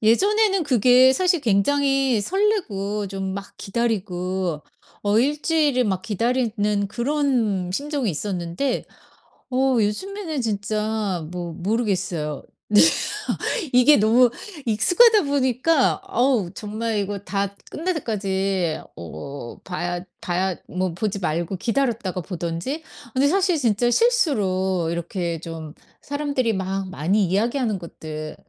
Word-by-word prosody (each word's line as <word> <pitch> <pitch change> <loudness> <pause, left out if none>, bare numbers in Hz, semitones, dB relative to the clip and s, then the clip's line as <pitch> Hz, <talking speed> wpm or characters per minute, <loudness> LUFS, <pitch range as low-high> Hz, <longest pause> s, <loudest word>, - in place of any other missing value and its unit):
예전에는 390 - +3
그게 255 0 +5
사실 360 +2 +2
굉장히 270 +2 +2
설레고 210 - 0
좀 190 0 -4
막 200 0 -7
기다리고 190 -6 -2 0.4
어 205 +1 +3
1 290 +5 +1
주일을 295 -6 +2
막 190 -4 -1
기다리는 215 -2 0
그런 240 -8 0
심정이 280 -2 -1
있었는데 180 - -2 0.7
어 260 0 +2
요즘에는 325 - -2
진짜 210 -4 -2
뭐 175 -2 -5
모르겠어요. 185 - -1 0.3
네. 210 - +7 0.9
이게 250 +4 +7
너무 230 +4 +5 0.4
익숙하다 385 - +5
보니까 275 +1 +2
아우 240 -7 +1
정말 220 +1 -3
이거 200 0 -3
다 200 0 -3 0.2
끝날 360 +4 -1
때까지 195 - -1 0.2
어 120 - -8
봐야 175 +2 -3 0.2
봐야 180 +1 -1
뭐 185 -1 -2
보지 200 +2 -2
말고 170 +2 -2
기다렸다가 230 -5 -1
보든지. 175 - -4 0.3
근데 270 +2 +3
사실 370 0 +2
진짜 240 -2 +2
실수로 190 - +2
이렇게 170 -1 -3
좀 160 -3 -7 0.3
사람들이 285 -5 -1
막 190 0 -3
많이 190 +4 +1
이야기하는 220 +3 0
것들 155 -2 -7
210 Hz, 255 characters per minute, -23 LUFS, 185-265 Hz, 0.9 s, 네